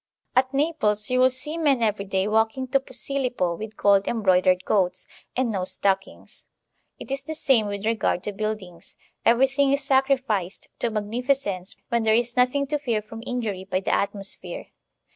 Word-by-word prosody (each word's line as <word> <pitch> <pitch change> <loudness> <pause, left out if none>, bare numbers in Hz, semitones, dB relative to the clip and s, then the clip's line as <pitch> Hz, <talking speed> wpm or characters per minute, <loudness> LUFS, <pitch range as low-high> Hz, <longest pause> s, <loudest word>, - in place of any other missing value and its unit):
At 260 +1 +3
Naples 275 -8 +1
you 255 - +2
will 255 0 +6
see 295 +6 -4
men 275 -7 +2
every 210 -2 0
day 190 0 0
walking 220 +4 +1
to 275 - +3
Posilippo 250 -8 -2
with 215 +3 -8
gold 200 -1 +4
embroidered 185 -4 +2
coats, 185 -3 +1 0.3
and 255 -3 +1
no 190 -3 -1
stock 190 +1 0
ings. - - -15 0.5
It - - -9
is 275 +1 -1
the 315 +3 -6
same 255 -8 +2
with 200 0 -4
regard 220 -5 0
to 210 - -3
buildings; 200 -4 -5 0.3
everything 270 +3 +4
is 280 0 +1
sacrificed 265 -8 0
to 235 - 0
magnificence 215 -2 -2
when 235 0 +1
there 220 0 +3
is 240 +1 0
nothing 255 +3 +2
to 295 +1 -2
fear 235 -7 -1
from 225 +2 -9
injury 220 -7 -3
by 185 -1 -1
the 195 - -1
atmosphere. 200 -1 -2
225 Hz, 170 wpm, -24 LUFS, 200-265 Hz, 0.5 s, will